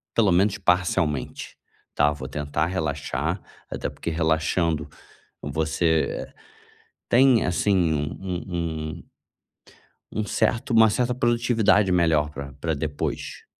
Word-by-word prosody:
pelo 105 -4 +4
menos 100 +4 +3
parcialmente, 90 -6 0 0.4
tá. 75 0 +3
Vou 65 -2 -7
tentar 75 +2 -1
relaxar, 80 -6 -2 0.3
até - - -3
porque - - -6
relaxando, 80 -1 0 0.5
você 80 +1 0 0.8
tem, 125 -1 +5
assim, 90 -1 +2
um 75 -1 0 0.2
um 90 -2 -4 0.5
um - - -11 1.1
um 110 - -2
certo 110 +3 0
uma 110 -1 +7
certa 125 +3 0
produtividade 115 -5 +2
melhor 80 -4 +2
pra 70 -2 -8
pra 80 +2 -1
depois. 75 0 -4
85 Hz, 110 wpm, -24 LUFS, 75-105 Hz, 1.1 s, uma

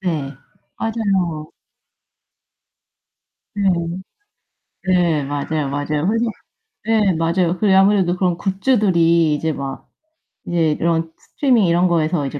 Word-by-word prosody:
네, 155 -7 -3 0.5
맞아요. 190 -9 -2 2.0
네. 200 -2 +1 1.1
네, 175 -6 +1
맞아요, 145 +1 -3
맞아요. 145 +2 -2
홀리 230 +2 +1 0.6
네 215 -4 +2
맞아요. 170 +2 0
그래 200 -1 +3
아무래도 190 -2 +4
그런 180 -2 0
굿즈들이 180 - +2
이제 160 +2 -1
막 135 -1 -7 0.6
이제 165 -3 +1
이런 165 0 -1
스트리밍 250 -8 +1
이런 175 +2 +3
거에서 160 -3 0
이제 145 +2 -6
170 Hz, 230 characters per minute, -19 LUFS, 155-195 Hz, 2.0 s, 아무래도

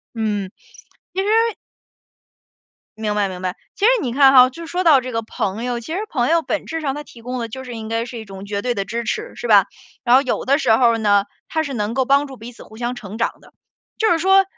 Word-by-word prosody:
嗯， 205 -4 -2 0.6
其 375 - -2
实 445 +2 +2 1.5
明 210 -1 -1
白， 205 -2 +1
明 180 -1 -7
白。 185 -1 -2 0.2
其 405 - -2
实 480 - +7
你 245 -5 -2
看 270 0 +6
哈， 255 -1 +8
就 335 +5 -9
说 355 +3 -2
到 310 -6 +6
这 255 0 -6
个 230 - -1
朋 220 0 -3
友， 245 -1 -2
其 240 +8 -6
实 380 - -1
朋 245 -4 0
友 330 0 +3
本 315 - -3
质 325 0 -4
上， 280 -3 -2
他 295 - -6
提 235 -5 -15
供 250 +2 -4
的 230 -1 -3
就 260 +4 -7
是 245 -2 -7
应 220 -1 -6
该 225 +1 -1
是 240 0 -8
一 220 - -7
种 195 -1 -10
绝 200 0 -3
对 245 +3 -1
的 200 -3 -2
支 235 +4 -4
持， 225 - -3
是 - - -5
吧。 205 -4 +6 0.4
然 250 -1 +5
后 270 - +5
有 260 - -2
的 280 +2 +3
时 250 -7 +3
候 230 0 +4
呢， 205 -2 +3 0.2
他 315 - 0
是 285 - -5
能 210 0 -2
够 265 0 +2
帮 280 +2 +3
助 270 -2 -10
彼 235 +1 -9
此 240 - -14
互 220 - -15
相 240 +2 -3
成 210 -3 -8
长 230 - -1
的， - - -19 0.5
就 440 - +2
是 340 - +3
说 385 +3 +5
245 Hz, 275 characters per minute, -20 LUFS, 220-285 Hz, 1.5 s, 哈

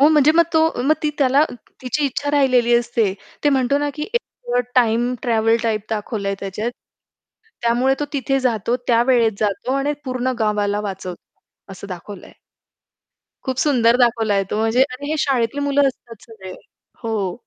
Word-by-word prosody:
हो 285 - +7
म्हणजे 305 -1 +5
मग 335 - +6
तो 320 - +4 0.2
मग 300 +4 +3
ती 305 - +1
त्याला 275 +2 +4 0.4
तिची 270 +4 -1
इच्छा 285 +2 -2
राहिलेली 255 -4 +3
असते. 230 -4 +1 0.3
ते 290 - +5
म्हणतो 270 0 +2
ना, 290 0 -1
की 300 - -5
एक 475 - +3 0.4
अ, - - +4
टाईम 240 0 +2
ट्रॅव्हल 225 -1 +2
टाइप 220 -2 0
दाखवलंय 205 -2 -2
त्याच्यात. 210 +4 -3 0.9
त्यामुळे 245 +3 +2
तो 295 - +1
तिथे 270 0 0
जातो, 235 -1 0
त्यावेळेत 235 -1 +3
जातो 210 +4 -1
आणि 290 +2 0
पूर्ण 255 0 -1
गावाला 210 -2 0
वाचवतो 195 -1 -9
असं 190 +1 -9
दाखवलंय. 190 +2 -9 1.1
खूप 260 -1 -2
सुंदर 245 -6 +3
दाखवलाय 225 -5 +2
तो - - -1
म्हणजे 225 +4 +3
अरे, 270 +1 -3
हे 315 - 0
शाळेतली 265 -1 0
मुलं 285 0 +2
असतात 235 -4 -10
सगळे. 190 -5 -10 0.5
हो. 205 -5 -2
240 Hz, 160 wpm, -20 LUFS, 220-270 Hz, 1.1 s, हो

